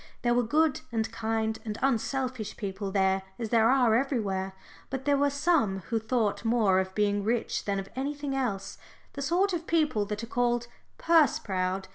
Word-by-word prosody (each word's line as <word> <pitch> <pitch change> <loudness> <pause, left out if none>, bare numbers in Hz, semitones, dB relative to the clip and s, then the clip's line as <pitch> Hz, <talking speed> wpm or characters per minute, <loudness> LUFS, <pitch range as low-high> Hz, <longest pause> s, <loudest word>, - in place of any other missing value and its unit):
There 240 0 +3
were 245 - +3
good 300 +5 +2
and 220 -1 -1
kind 220 -1 -1
and 215 -1 -4
unselfish 255 -2 -1
people 200 -1 -4
there 190 -1 +2 0.2
as 230 -2 -4
there 225 0 +4
are 250 -4 +4
everywhere, 205 -8 -1 0.4
but 265 0 -4
there 285 -1 +3
were 285 +1 +3
some 280 - +1
who 225 - +2
thought 220 -1 0
more 225 -5 +3
of 190 0 -3
being 205 -1 +1
rich 230 +2 -1
than 200 -1 0
of 195 0 -4
anything 280 +1 -3
else 215 -8 -3 0.3
the 280 - -6
sort 360 +7 +1
of 340 -1 -3
people 305 -10 +1
that 210 +2 -4
are - - -2
called 240 0 0 0.3
"purse 325 -6 +4
proud." 190 -1 -2
230 Hz, 180 wpm, -28 LUFS, 205-270 Hz, 0.4 s, there